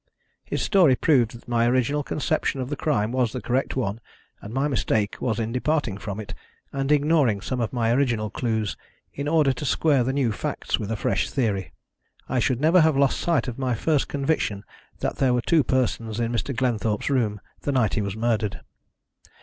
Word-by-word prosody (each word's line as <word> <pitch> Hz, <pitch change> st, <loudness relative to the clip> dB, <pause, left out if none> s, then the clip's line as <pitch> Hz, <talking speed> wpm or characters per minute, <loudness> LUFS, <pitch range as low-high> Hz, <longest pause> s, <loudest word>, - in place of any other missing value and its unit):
His -, -, -3 dB
story 175 Hz, -10 st, +5 dB
proved 125 Hz, -6 st, +2 dB
that 115 Hz, -, -14 dB
my 120 Hz, -1 st, +2 dB
original 130 Hz, +4 st, +1 dB
conception 145 Hz, 0 st, -1 dB
of 130 Hz, +2 st, -4 dB
the -, -, 0 dB
crime 120 Hz, -7 st, 0 dB
was 125 Hz, -3 st, +1 dB
the 125 Hz, -, -4 dB
correct 125 Hz, +2 st, -1 dB
one, 115 Hz, -4 st, -2 dB, 0.4 s
and 105 Hz, -, -8 dB
my 135 Hz, +4 st, 0 dB
mistake 110 Hz, -6 st, 0 dB
was 115 Hz, -3 st, -1 dB
in 115 Hz, 0 st, -2 dB
departing 130 Hz, -3 st, 0 dB
from 100 Hz, 0 st, -5 dB
it, 105 Hz, -, -7 dB, 0.4 s
and 135 Hz, +1 st, -1 dB
ignoring 145 Hz, -7 st, +3 dB
some 125 Hz, +5 st, -3 dB
of 115 Hz, -, -1 dB
my 115 Hz, -2 st, +1 dB
original 120 Hz, -6 st, 0 dB
clues 110 Hz, -4 st, -1 dB, 0.4 s
in 140 Hz, +1 st, -4 dB
order 150 Hz, -3 st, +3 dB
to 130 Hz, -, -7 dB
square 145 Hz, -1 st, +2 dB
the 130 Hz, -, 0 dB
new 135 Hz, -4 st, +1 dB
facts 105 Hz, -, -2 dB
with 105 Hz, -, -4 dB
a 115 Hz, -, -1 dB
fresh -, -, 0 dB
theory. 105 Hz, -8 st, -1 dB, 0.6 s
I 130 Hz, -, 0 dB
should 130 Hz, -1 st, +1 dB
never 165 Hz, +5 st, +5 dB
have 155 Hz, -3 st, +3 dB
lost 140 Hz, -1 st, +2 dB
sight 170 Hz, -5 st, +1 dB
of 125 Hz, +1 st, -5 dB
my 130 Hz, -2 st, 0 dB
first 150 Hz, +4 st, +1 dB
conviction 135 Hz, -8 st, -1 dB, 0.4 s
that -, -, -2 dB
there 130 Hz, -2 st, +3 dB
were 125 Hz, -, +1 dB
two 160 Hz, +3 st, +3 dB
persons 115 Hz, -3 st, -1 dB
in 115 Hz, 0 st, 0 dB
Mr. 120 Hz, +3 st, -2 dB
Glenthorpe's 115 Hz, -2 st, 0 dB
room 110 Hz, -6 st, +1 dB, 0.2 s
the 145 Hz, -, -1 dB
night 125 Hz, -7 st, +2 dB
he 110 Hz, -, 0 dB
was 100 Hz, -1 st, -3 dB
murdered. 110 Hz, -4 st, -1 dB
125 Hz, 200 wpm, -24 LUFS, 110-140 Hz, 0.6 s, story